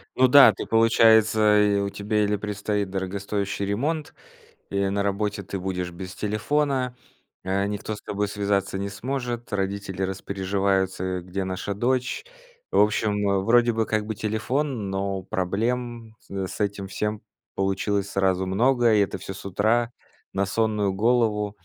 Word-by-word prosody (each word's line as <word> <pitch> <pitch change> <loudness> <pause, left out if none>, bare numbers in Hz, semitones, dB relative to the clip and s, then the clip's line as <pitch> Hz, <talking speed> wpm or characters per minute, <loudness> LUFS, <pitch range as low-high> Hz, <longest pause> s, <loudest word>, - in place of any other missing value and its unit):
Ну 130 - +5
да, 140 +2 +9
ты - - -6
получается, 110 -2 +5
и 100 -1 +3
у 100 0 -1
тебя 105 +1 -1
или 105 0 +1
предстоит 105 -1 -2
дорогостоящий 100 +1 -3
ремонт, 145 +10 -2 0.6
или 100 0 +1
на 100 0 0
работе 100 0 -1
ты 95 +1 -5
будешь 90 -1 -3
без 90 +1 -8
телефона. 125 +4 0 0.5
Э, 100 +1 0
никто 105 +1 -4
с 105 - -12
тобой 105 0 -2
связаться 100 -1 -1
не 100 0 -3
сможет, 120 +1 -4
родители 95 -1 -3
распереживаются: 95 0 -1
э, 95 -1 -2
где 90 +2 -4
наша 95 +2 -3
дочь? 125 - -1 0.5
В - - +3
общем, 105 0 +3 0.2
э, 100 - +2
вроде 120 +2 +4
бы 110 0 0
как 110 -1 -1
бы 110 - -3
телефон, 110 +2 -2
но 95 0 -2
проблем 115 +5 -2
с - - -22 0.2
с 95 - -8
этим 100 -1 -2
всем 105 +2 -3 0.3
получилось 95 +1 -1
сразу 95 -1 +1
много, 120 +4 +3
и - - +4
это 100 -1 -1
всё 95 +1 -7
с 95 - -11
утра 110 +5 +1 0.4
на 100 0 +1
сонную 105 -1 +1
голову. 105 -1 +1
100 Hz, 155 wpm, -25 LUFS, 95-110 Hz, 0.6 s, да